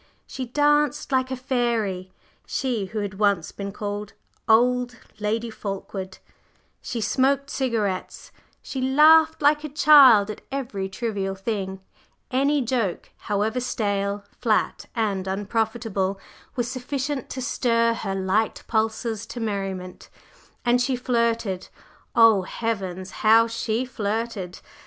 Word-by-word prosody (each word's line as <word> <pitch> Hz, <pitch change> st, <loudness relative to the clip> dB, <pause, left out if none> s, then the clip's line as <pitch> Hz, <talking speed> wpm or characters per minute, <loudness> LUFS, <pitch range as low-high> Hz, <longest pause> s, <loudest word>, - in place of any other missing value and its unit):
She 260 Hz, -2 st, -6 dB
danced 295 Hz, +2 st, +2 dB
like 260 Hz, -1 st, +2 dB
a 260 Hz, -, -2 dB
fairy, 235 Hz, -8 st, -1 dB, 0.4 s
she 245 Hz, -7 st, -1 dB
who 215 Hz, +2 st, -4 dB
had 195 Hz, -1 st, -5 dB
once 200 Hz, -6 st, +2 dB
been 200 Hz, 0 st, -6 dB
called 205 Hz, 0 st, -5 dB, 0.4 s
"old" 245 Hz, +2 st, +3 dB, 0.2 s
Lady 225 Hz, +2 st, -1 dB
Fulkeward; 195 Hz, -2 st, -6 dB, 0.6 s
she 240 Hz, -, -4 dB
smoked 275 Hz, +4 st, +1 dB
cigarettes; 220 Hz, -8 st, -2 dB, 0.3 s
she 265 Hz, -, -4 dB
laughed 310 Hz, +4 st, +5 dB
like 295 Hz, +1 st, +4 dB
a 305 Hz, -, -4 dB
child 270 Hz, -8 st, +7 dB
at 210 Hz, -, -10 dB
every 235 Hz, -8 st, -3 dB
trivial 195 Hz, -2 st, -3 dB
thing 195 Hz, -2 st, -4 dB, 0.5 s
any 280 Hz, +2 st, +2 dB
joke, 230 Hz, -6 st, -2 dB
however 215 Hz, +4 st, -1 dB
stale, 200 Hz, -4 st, -2 dB
flat 225 Hz, -3 st, 0 dB
and 200 Hz, -5 st, -1 dB
unprofitable, 205 Hz, -1 st, -1 dB, 0.4 s
was 245 Hz, -2 st, -1 dB
sufficient 265 Hz, +2 st, -3 dB
to 260 Hz, -, -5 dB
stir 230 Hz, -2 st, +1 dB
her 195 Hz, -4 st, -3 dB
light 195 Hz, +3 st, 0 dB
pulses 220 Hz, 0 st, -1 dB
to 240 Hz, -, -7 dB
merriment; 195 Hz, -4 st, -4 dB, 0.6 s
and 245 Hz, +1 st, +3 dB
she 255 Hz, +1 st, +1 dB
flirted 230 Hz, -6 st, 0 dB, 0.5 s
oh, 225 Hz, -4 st, +6 dB
heavens! 190 Hz, -3 st, -4 dB
how 225 Hz, +1 st, +6 dB
she 230 Hz, +1 st, -2 dB
flirted! 215 Hz, -5 st, -3 dB
225 Hz, 120 wpm, -24 LUFS, 200-250 Hz, 0.6 s, child